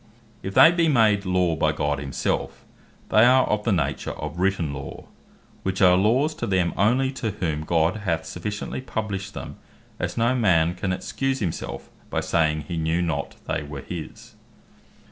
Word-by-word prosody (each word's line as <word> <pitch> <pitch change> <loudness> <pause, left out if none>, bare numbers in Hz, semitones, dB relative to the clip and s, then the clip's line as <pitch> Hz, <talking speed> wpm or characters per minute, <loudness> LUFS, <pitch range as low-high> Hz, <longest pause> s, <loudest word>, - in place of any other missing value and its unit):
If 95 - -6
they 165 - +9
be 170 -1 +2
made 110 -8 +3
Law 90 -2 +2
by 80 -1 +1
God 75 -2 -1
himselfe, 70 0 -3 0.4
they 110 - +5
are 130 +2 +6
of 105 0 -1
the 115 - +2
nature 80 -7 -1
of 75 +3 -6
written 90 -6 0
Law, 70 -1 -8 0.6
which 95 -1 -2
are 90 -2 +6
Laws 120 - +2
to 120 - -1
them 95 -3 +1
only 125 +7 +2
to 125 -4 -3
whom 85 -7 -2
God 80 +4 +1
hath 85 -6 -2
so - - -7
sufficiently 105 +7 -4
published 100 -6 -4
them, - - -7 0.4
as - - -3
no 120 +2 +3
man 90 -9 +3
can 95 +1 -3
excuse 135 +8 -2
himself, 90 -10 -4 0.2
by - - -1
saying, 80 -2 +1
he 85 +3 -5
know 80 +1 0
not 85 -2 -2
they - - -1
were 70 -2 -7
his. 80 -1 -8
95 Hz, 175 wpm, -24 LUFS, 80-110 Hz, 0.6 s, they